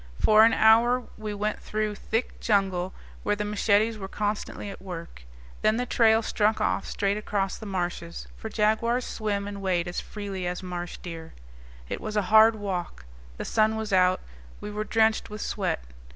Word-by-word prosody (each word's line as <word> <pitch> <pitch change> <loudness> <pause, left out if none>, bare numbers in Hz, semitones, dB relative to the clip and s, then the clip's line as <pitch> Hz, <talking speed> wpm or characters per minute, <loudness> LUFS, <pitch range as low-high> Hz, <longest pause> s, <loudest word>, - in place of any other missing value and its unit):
For 215 0 +6
an 225 0 +6
hour 235 +3 +5
we 215 -1 -5
went 210 +1 -2
through 215 0 -2
thick 225 +3 -3
jungle, 190 -4 +1 0.3
where 205 - +1
the 210 0 -3
machetes 210 +1 +2
were 190 - -5
constantly 205 +1 -3
at - - -11
work. 170 - -8 0.4
Then 215 +1 +3
the 250 - 0
trail 225 -2 +4
struck 215 0 +1
off - - 0
straight 200 0 0
across 200 -2 -1
the 220 - -7
marshes, 175 -3 -4
for 220 - -7
jaguars 230 +3 +1
swim 205 -2 -2
and 200 -1 -6
wade 180 -2 0
as 175 - -3
freely 195 -4 -5
as 180 +2 -4
marsh 175 -1 -5
deer. 165 -2 -8 0.5
It - - -4
was 215 0 -3
a 210 - +3
hard 220 +1 +8
walk. 185 - -4 0.3
The - - -5
sun 220 0 +2
was 220 -2 -3
out. 185 0 +4 0.4
We 210 - -6
were 210 +1 -3
drenched 220 0 +2
with 210 0 -7
sweat. 185 - -2
210 Hz, 180 wpm, -27 LUFS, 190-220 Hz, 0.5 s, hard